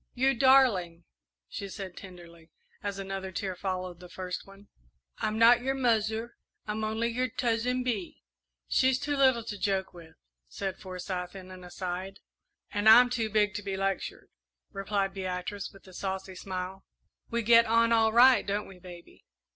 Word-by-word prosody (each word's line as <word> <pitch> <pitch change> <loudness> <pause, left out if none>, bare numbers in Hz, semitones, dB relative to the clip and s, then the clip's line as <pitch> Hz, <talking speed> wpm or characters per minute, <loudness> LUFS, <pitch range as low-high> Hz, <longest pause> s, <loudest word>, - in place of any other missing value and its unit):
"You 265 +2 +3
darling," 230 -10 +4 0.4
she 200 - -6
said 190 -2 -7
tenderly, 170 -3 -13 0.3
as 200 -1 -4
another 195 -1 -5
tear 185 0 -3
followed 185 -1 -4
the 180 0 -12
first 180 0 -6
one; 195 +1 -16 0.5
"I'm 215 0 -1
not 235 +2 +6
your 265 +2 -1
'muzzer,' 225 -2 0 0.3
I'm 215 +1 -3
only 220 +2 -1
your 250 +2 -1
'Tuzzin 250 +1 0
Bee.'" 220 -8 -4 0.4
"She's 260 0 +3
too 285 +2 -2
little 260 -4 +3
to 205 -2 -6
joke 190 -2 -1
with," 165 -2 -14 0.3
said 190 - -5
Forsyth, 180 -1 -5
in 185 -1 -10
an 185 -1 -11
aside. 185 +2 -5 0.5
"And 205 +1 +3
I'm 245 +2 +8
too 230 -3 -1
big 210 -1 +2
to 205 - -4
be 195 -1 -4
lectured," 195 0 -3 0.4
replied 195 0 -2
Beatrice, 185 +1 -4
with 195 - -18
a 185 - -14
saucy 190 0 -4
smile. 185 +1 -6 0.5
"We 235 0 -1
get 230 +1 +6
on 230 +1 +3
all 225 -1 +4
right, 250 +3 +6
don't 205 +1 -2
we, 190 -2 -13
baby?" 175 -1 -13
200 Hz, 165 wpm, -29 LUFS, 185-230 Hz, 0.5 s, I'm